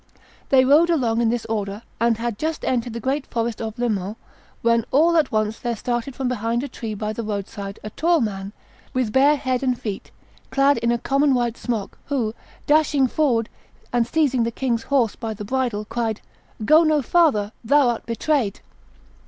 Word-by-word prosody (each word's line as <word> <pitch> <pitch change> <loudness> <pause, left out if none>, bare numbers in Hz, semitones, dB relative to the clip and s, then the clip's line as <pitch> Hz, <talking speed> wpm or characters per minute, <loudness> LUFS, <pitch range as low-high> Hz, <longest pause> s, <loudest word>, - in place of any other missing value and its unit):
They 260 -1 +5
rode 305 +6 +5
along 240 -8 +1
in 230 - +3
this 240 0 -1
order, 210 -1 -3 0.2
and 230 -1 +2
had 230 -2 -3
just 315 0 -2
entered 240 -2 -1
the 235 - -4
great 270 +4 -2
forest 230 -1 -2
of 220 0 -5
Le 245 0 0
Mans, 205 -1 -2 0.5
when 230 0 +3
all 330 +5 +4
at 315 -4 +3
once 215 0 0
there 240 -1 -2
started 240 +3 -3
from 265 - -2
behind 235 0 -1
a - - -3
tree 225 -5 -6
by 215 +1 -3
the 230 - -4
road 205 -3 -3
side 200 -2 -7
a 215 - -6
tall 335 +6 +2
man, 195 -4 -3 0.4
with 245 -4 0
bare 280 +3 +5
head 260 -3 -1
and 255 -2 0
feet, 205 -3 -5 0.4
clad 275 +1 +3
in 235 - +1
a 240 - +2
common 275 +2 +2
white 240 -2 0
smock, 225 -6 -4
who, 245 -6 -1 0.3
dashing 295 -2 +3
forward 245 -5 +1 0.5
and 240 -1 +2
seizing 275 -4 +2
the 230 - +1
king's 235 -1 -1
horse 250 -7 +2
by 225 -2 -5
the 210 - -7
bridle, 240 -3 -1
cried, 225 -1 -2 0.4
'Go 310 +6 +7
no 305 -3 +2
farther; 240 -10 +3
thou 280 +2 +4
art 235 - -3
betrayed! 235 -2 0
235 Hz, 195 wpm, -22 LUFS, 220-275 Hz, 0.5 s, Go